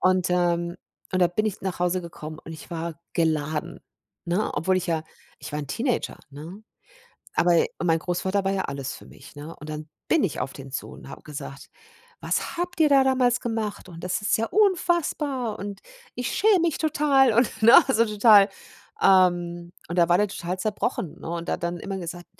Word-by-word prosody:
Und, 185 -1 +2
ähm, 175 -1 +1 0.4
und 185 - +1
da - - +6
bin 215 +5 -1
ich 210 - -4
nach 190 -2 -3
Hause 180 +1 +1
gekommen 155 -2 -8
und 165 - -8
ich 155 -3 -11
war 165 -1 -5
geladen, 160 +1 -1 0.5
ne? 180 +5 0
Obwohl 185 +6 +1
ich 185 0 -2
ja 165 -2 0 0.4
ich - - -9
war 150 - -2
'n 145 - -7
Teenager, 245 - -2
ne? 160 +9 -10 0.7
Aber 170 -1 +4 0.2
mein 165 -2 +2
Großvater 190 +3 -1
war 195 - +1
ja 195 -1 0
alles 140 -1 -5
für - - -13
mich, - - -15
ne? 150 +3 -9
Und 150 +1 -9
dann 155 0 -6 0.2
bin 325 - +3
ich 170 - -2
auf 130 +2 -3
den 135 -1 -10
zu 135 - -5
und - - -12
habe - - -10
gesagt: 140 -2 -8 0.5
„Was - - -2
habt 350 0 -3
ihr 310 - +6
da 275 -2 +5
damals 255 -2 +2
gemacht? 225 -4 -4
Und 165 -2 -11
das 180 +3 -2
ist 205 - +2
ja 225 - 0
unfassbar 315 - +1
und 200 0 -6 0.3
ich 245 - -3
schäme 415 -3 +4
mich 335 -3 0
total 285 -5 +3
und“, 225 -1 +1
ne? 230 +2 +8 0.2
So 230 -1 +4
total, 210 -1 +6 0.5
ähm. 175 -2 +3 0.2
Und 170 +2 -3
da 170 -1 +5
war 175 - +5
der 210 0 +2
total 180 -1 -4
zerbrochen, 200 -4 -3
ne? - - -7
Und 170 0 -4
hat - - -2
dann 170 0 -2
immer 195 +2 -5
gesagt: 175 0 -7
180 Hz, 200 wpm, -25 LUFS, 170-225 Hz, 0.7 s, ne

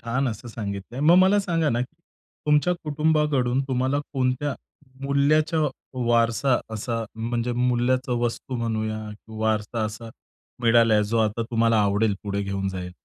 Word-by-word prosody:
छान 125 +4 -1
असं 115 +1 -6
सांगितलंय. 105 +3 -6
मग 160 +4 +6
मला 190 +2 +5
सांगा 165 -5 0
ना 120 +1 0
की 125 - -5 0.5
तुमच्या 150 +4 +3
कुटुंबाकडून 150 -4 +1
तुम्हाला 130 +2 +1
कोणत्या 130 +1 0 0.5
मूल्याच्या 155 +3 +2 0.5
वारसा 115 +2 +3 0.2
असा 115 +1 -3
म्हणजे 115 +2 -2
मूल्याचा 125 +1 +1
वस्तू 120 +2 -3
म्हणूया 110 -2 -2
किंवा 110 +1 -11
वारसा 110 +1 0
असा 110 +2 -6 0.5
मिळालाय, 115 -2 +5
जो 115 +2 -1
आता 110 +1 +1
तुम्हाला 115 -1 +3
आवडेल 100 +1 +2
पुढे 100 0 -2
घेऊन 100 0 -2
जाय 90 -1 -5
120 Hz, 140 wpm, -24 LUFS, 110-135 Hz, 0.5 s, मग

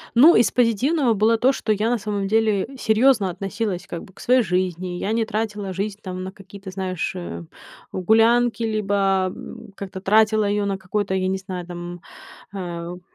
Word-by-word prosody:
Ну, 300 +8 +8
из 235 - +4
позитивного 250 +3 +2
было 220 +2 +3
то, 255 +4 +4
что 235 - -2
я 215 +2 +1
на 245 - +2
самом 205 -2 -3
деле 215 -1 +2
серьёзно 220 -3 +3
относилась 195 0 -4
как 170 -3 -6
бы 190 - -16
к - - -19
своей 250 0 +3
жизни. 180 -1 -2
Я 205 - -2
не 225 0 +1
тратила 210 -3 -3
жизнь 200 +2 -3
там 185 -1 -5
на 190 - -6
какие-то, 195 0 -11
знаешь, 185 -2 -3
э, 85 -1 -6 0.5
гулянки, 225 +5 +3
либо, 215 -2 -1 0.4
м, 230 -2 -10
как-то 190 -1 -7
тратила 215 +2 +3
её 205 0 0
на 195 -1 -1
какой-то, 190 +1 -2
я 185 0 0
не 190 0 0
знаю 185 -2 -6
там, 175 0 -7 0.5
э, 170 -3 -5
у. 180 - -11
200 Hz, 185 wpm, -22 LUFS, 185-225 Hz, 0.5 s, Ну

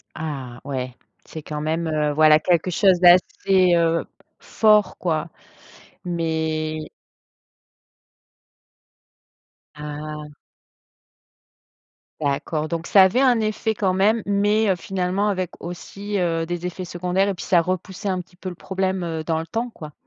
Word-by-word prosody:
Ah 135 -6 -6
ouais, 130 -3 -4 0.3
c'est 160 - -8
quand 150 -1 -5
même, 160 +2 -1
heu, 150 -1 0
voilà 155 0 +6
quelque 175 +2 +1
chose 185 0 +4
d'assez, 185 +1 +4
heu, 165 0 +1 0.3
fort 210 -3 +3
quoi. 160 -1 -2 0.8
Mais 160 -2 -2 3.0
Ah. 150 0 -7 1.9
D'accord. 150 +2 -1
Donc 170 0 -4
ça 195 - +7
avait 190 +8 +3
un 250 -4 +4
effet 220 0 -1
quand 190 -3 0
même 210 +4 +2
mais 205 0 +2
finalement 190 +3 -1
avec 185 -3 -2
aussi, 200 +4 -6
heu, 165 -2 0
des 175 +1 -4
effets 180 +1 -5
secondaires 180 +3 -1
et - - 0
puis 180 - -8
ça 175 -2 +4
repoussait 185 +3 -4
un 185 -1 -1
petit 180 0 -11
peu 185 0 -6
le 175 - -8
problème, 190 0 -2
heu, 160 -1 -4
dans 160 0 -1
le 165 - -6
temps, 235 +5 -3
quoi? 155 -9 -11
175 Hz, 135 wpm, -22 LUFS, 155-190 Hz, 3.0 s, ça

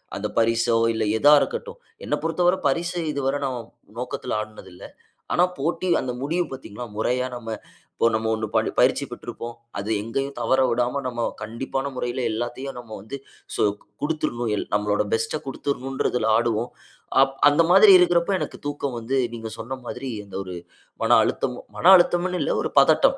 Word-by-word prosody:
அந்த - - -2
பரிசோ 115 +1 +3 0.2
இல்ல 110 0 -1
எதா 145 +5 +6
இருக்கட்டும். 475 +1 -4 0.3
என்ன - - 0
பொறுத்தவரை 175 +3 +2
பரிச 170 +5 0 0.2
இதுவர 140 -1 -1
நம்ம 130 -2 -2 0.4
நோக்கத்துல 125 -1 -3
ஆடினது 110 -3 -10
இல்ல. - - -14 0.5
ஆனா 175 - +4 0.2
போட்டி 175 +2 -1
அந்த 125 - -3
முடிவு 170 +6 0
பார்த்தீங்ளா? 125 -3 -7
மொறையா 125 +3 0
நம்ம 115 -2 -7 0.5
இப்போ - - +4
நம்ம 110 0 -1
1 110 0 -3
ப - - +6 0.2
பயிற்சி - - +4
பெற்றிருப்போம். 120 0 -7 0.2
அது 100 - -5
எங்கேயும் 135 +6 -3
தவற 130 0 +2
விடாம 120 +3 0
நம்ம 120 -2 -3 0.2
கண்டிப்பான 135 +5 -3
முறையில 125 0 -3
எல்லாத்தையும் 120 +4 -4
நம்ம 115 -2 -12
வந்து 120 +7 -7 0.4
சொ - - +1 0.4
குடுத்துரணும். 120 -7 -1
எல் - - -3
நம்மளோட 105 0 +1
பெஸ்ட்ட 115 +7 0
குடுத்துரணுன்றதுல 135 -4 -1
ஆடுவோம். 115 0 0 0.5
அப் 135 0 +2
அந்த 150 +3 +4
மாதிரி 195 +2 +8
இருக்கிறப்போ 175 +1 +3
எனக்கு - - -5
தூக்கம் 140 -3 -3
வந்து 130 +4 -1 0.2
நீங்க 115 -1 -6
சொன்ன 130 +4 -5
மாதிரி 135 - -5 0.2
அந்த 100 - -7
1 90 -1 -7 0.5
மன - - +6
அழுத்தம், - - -2 0.2
மன - - -5
அழுத்தம்னு 175 +1 +1
இல்ல - - 0
1 - - -3
பதட்டம். - - +4
125 Hz, 160 wpm, -24 LUFS, 115-145 Hz, 0.5 s, மாதிரி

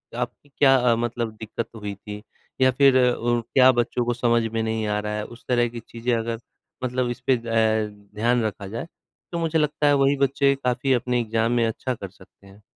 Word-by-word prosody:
आपकी 125 +4 -5
क्या 135 -2 +6
अ, 125 -2 +3
मतलब 120 -1 -2
दिक्कत 110 +1 -5
हुई 105 -2 -5
थी? 105 +1 -9 0.4
या 130 0 +6
फिर 135 0 +5 0.2
उ 120 0 0
क्या 130 +3 +4
वो 130 - +5
बच्चों 120 +1 -2
को 120 - +1
समझ 120 -1 +2
में 115 - 0
नहीं 110 -1 -1
आ 105 0 0
रहा 105 0 -3
है, 105 - -3
उस 120 +1 -14
तरह 120 -1 +2
की 120 0 -7
चीज़ें 120 +1 -3
अगर 115 0 -3 0.4
मतलब 125 0 -1
इसपे 130 +2 0
अ, 110 -2 +1 0.3
ध्यान 120 +2 +2
रखा 100 -2 -4
जाए, 115 +10 -5 0.4
तो 170 - -3
मुझे 165 -1 +1
लगता 150 0 +1
है 145 - +5
वही 135 +1 +3
बच्चे 140 0 +2
काफ़ी 125 +2 +1
अपने 125 0 0
एग्ज़ाम 115 +1 0
में 120 -1 +2
अच्छा 130 +3 -3
कर 100 -3 -8
सकते 95 +1 -20
हैं। 100 +2 -17
120 Hz, 210 wpm, -24 LUFS, 110-130 Hz, 0.4 s, क्या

